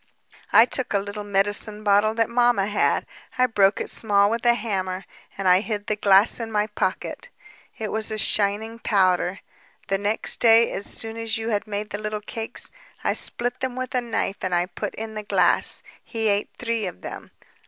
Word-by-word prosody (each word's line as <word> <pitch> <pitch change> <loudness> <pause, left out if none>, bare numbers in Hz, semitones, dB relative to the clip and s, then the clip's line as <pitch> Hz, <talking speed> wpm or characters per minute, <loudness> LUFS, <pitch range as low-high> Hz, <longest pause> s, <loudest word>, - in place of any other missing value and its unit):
"I 225 - +7
took 250 -3 -1
a - - +3
little 205 +1 -6
medicine 205 +1 +2
bottle 210 +1 +3
that 225 -1 +2
mamma 240 -4 +2
had; 210 +1 +1 0.3
I 255 - +4
broke 200 -4 +2
it - - -3
small 205 -2 +3
with 230 0 -2
a 240 - +5
hammer, 190 -4 -3 0.3
and 195 -1 -2
I 180 0 +6
hid 210 -1 -4
the 215 - -1
glass 200 +2 +4
in 225 -1 -5
my 210 -1 +1
pocket. 210 - -4 0.5
It 215 -2 -4
was 220 0 -1
a 215 - -3
shining 215 +2 0
powder... 185 -3 +1 0.5
The 195 0 +1
next 205 +2 -2
day, 230 0 +5
as 200 - -4
soon 225 0 -4
as 225 -1 -1
you 225 +1 -3
had 210 -1 -1
made 210 0 -4
the 205 - -4
little 215 0 -3
cakes... 225 +1 -4 0.3
I - - +1
split 245 +1 +1
them 260 -1 -3
with 255 -1 -5
a 250 - +1
knife 230 -4 -2
and 185 -1 0
I 175 0 +2
put 175 -1 -6
in 220 0 -6
the 215 - -5
glass... 205 - +2 0.2
He 225 -2 -2
ate 200 0 0
three 230 -3 -2
of 90 - -8
them - - -8
210 Hz, 195 wpm, -23 LUFS, 200-225 Hz, 0.5 s, I